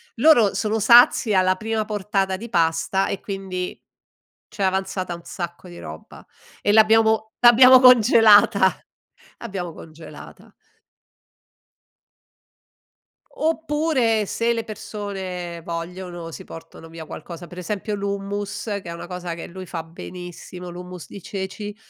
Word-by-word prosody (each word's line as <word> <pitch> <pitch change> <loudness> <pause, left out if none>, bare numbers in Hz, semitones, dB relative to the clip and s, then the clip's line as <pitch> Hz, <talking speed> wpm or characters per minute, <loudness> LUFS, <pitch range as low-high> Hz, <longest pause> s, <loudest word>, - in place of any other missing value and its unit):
loro 240 -5 +5
sono 220 0 -1
sazi 235 0 +6
alla 185 -1 +3
prima 220 +2 -2
portata 200 -2 -1
di 230 +5 -8
pasta 165 +1 +1
e 200 - -4
quindi 190 -2 -5 0.7
c'è 200 - -5
avanzata 190 -1 -1
un 170 - -12
sacco 175 +1 -7
di 175 - -11
roba 80 +1 -11 0.4
e 205 - +2
l'abbiamo 220 0 +4
l'abbiamo 255 +2 +8
congelata, 220 -5 +6 0.6
l'abbiamo 190 -7 -6
congelata. 160 +1 -13 2.8
Oppure, 300 -8 0
se 230 +4 0
le 230 -1 -3
persone 195 -5 -6
vogliono, 170 0 -6
si - - -9
portano 165 0 -12
via 165 -1 -9
qualcosa. 165 +2 -9
Per 175 +1 -13
esempio, 205 +4 -4
l'hummus, 200 0 -4
che 205 -3 -3
è 170 - -7
una 170 - -7
cosa 180 -1 -5
che 170 - -8
lui 185 +1 -9
fa 165 -2 -6
benissimo, 175 +2 -10
l'hummus 180 -1 -9
di 200 - -11
ceci, 200 +2 -6
195 Hz, 125 wpm, -22 LUFS, 175-220 Hz, 2.8 s, l'abbiamo